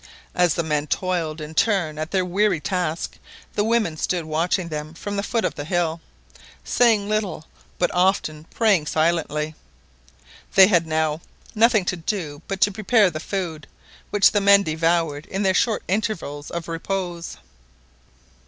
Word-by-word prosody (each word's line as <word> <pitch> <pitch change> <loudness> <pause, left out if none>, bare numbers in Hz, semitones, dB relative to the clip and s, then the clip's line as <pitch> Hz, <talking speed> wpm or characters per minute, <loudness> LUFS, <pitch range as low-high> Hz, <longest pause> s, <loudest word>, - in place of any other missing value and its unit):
As 175 -3 +2
the 170 - 0
men 150 -1 -1
toiled 170 -4 -1
in 155 +1 -7
turn 170 -6 +1
at 155 +1 -3
their 185 -1 0
weary 190 0 +1
task 175 -1 -3 0.3
the 205 - +1
women 220 -7 +1
stood 175 +1 -1
watching 170 +3 0
them 155 +1 -6
from 205 +4 -5
the 200 - 0
foot 225 +2 -1
of - - -3
a - - -2
hill, 170 0 -1 0.6
saying 225 -4 +3
little, 205 -7 -2 0.3
but 175 - 0
often 180 -4 +1
praying 195 -6 +2
silently. 155 -1 0 1.0
They 190 - +10
had 170 -4 +2
now 155 0 0 0.3
nothing 220 -3 +4
to 180 - 0
do 160 -4 -4
but 195 -1 -3
to 205 - +4
prepare 210 -1 +3
the 155 - -5
food, 160 -4 -4 0.4
which 205 -1 +5
the 205 - +1
men 200 0 +6
devoured 160 -1 0
in 195 +1 -2
their 190 -1 +3
short 220 +4 +1
intervals 180 -8 -2
of 170 -1 -5
repose. 170 0 -4
175 Hz, 155 wpm, -23 LUFS, 155-200 Hz, 1.0 s, They